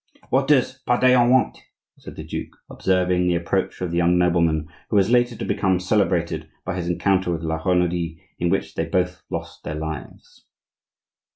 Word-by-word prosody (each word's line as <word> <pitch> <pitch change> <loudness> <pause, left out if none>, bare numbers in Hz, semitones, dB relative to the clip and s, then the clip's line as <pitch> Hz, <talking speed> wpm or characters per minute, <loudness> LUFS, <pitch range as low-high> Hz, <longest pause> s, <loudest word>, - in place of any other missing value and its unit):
"What 135 +1 +2
does 130 -2 +2
Pardaillan 125 0 +4
want?" 130 +1 +2 0.4
said - - -11
the - - -7
duke, - - -6
observing 90 -1 +1
the 90 - +2
approach 85 +3 -1
of 90 -2 -2
the 85 - -1
young 85 +1 +3
nobleman 85 -3 +2 0.2
who - - -1
was 100 +2 +3
later 120 -1 +3
to - - -5
become 95 -2 +1
celebrated 85 -5 0 0.2
by 95 - -3
his 90 -2 -3
encounter 95 +1 +1
with 85 -1 -3
La 80 0 -2
Renaudie, 90 -2 0 0.2
in 85 - +1
which 95 - -1
they - - -2
both 90 0 -1
lost - - -6
their 75 - -4
lives. 80 -1 -8
90 Hz, 175 wpm, -22 LUFS, 85-100 Hz, 0.4 s, Pardaillan